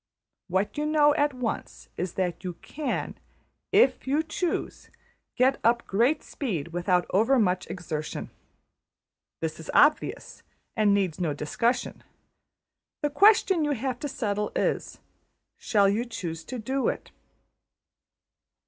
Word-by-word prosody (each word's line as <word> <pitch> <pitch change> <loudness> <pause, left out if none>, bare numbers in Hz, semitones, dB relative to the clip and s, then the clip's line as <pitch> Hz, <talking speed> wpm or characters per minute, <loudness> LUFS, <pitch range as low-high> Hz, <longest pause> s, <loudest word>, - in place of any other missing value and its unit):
What 190 - -1
you 300 - 0
know 300 -1 +4
at 290 -1 +2
once 250 -3 -5
is 180 0 -3
that 180 -3 -2
you 180 -1 -4
can, 300 -1 -4 0.5
\emph{if 260 0 +3
you 290 +4 +2
choose}, 325 +2 -3 0.5
get 260 +2 +3
up 235 +1 +3
great 240 +10 +2
speed 180 - -4
without 175 +1 +1
overmuch 210 -3 +2
exertion. 155 -4 -5 1.1
That 160 -1 -3
is 160 - -10
obvious, 300 +1 +2 0.3
and 210 -2 +4
needs 185 -4 -1
no 155 -4 0
discussion. 235 - -1 1.0
The 295 - +1
question 385 0 +5
you 295 -1 +1
have 255 0 -3
to 290 - -3
settle 210 -6 -2
is: - - -1 0.6
Shall 205 -4 +3
you 210 +4 +1
choose 175 -9 -6
to 255 - -5
do 260 +4 -1
it? - - -3
230 Hz, 125 wpm, -27 LUFS, 180-280 Hz, 1.1 s, question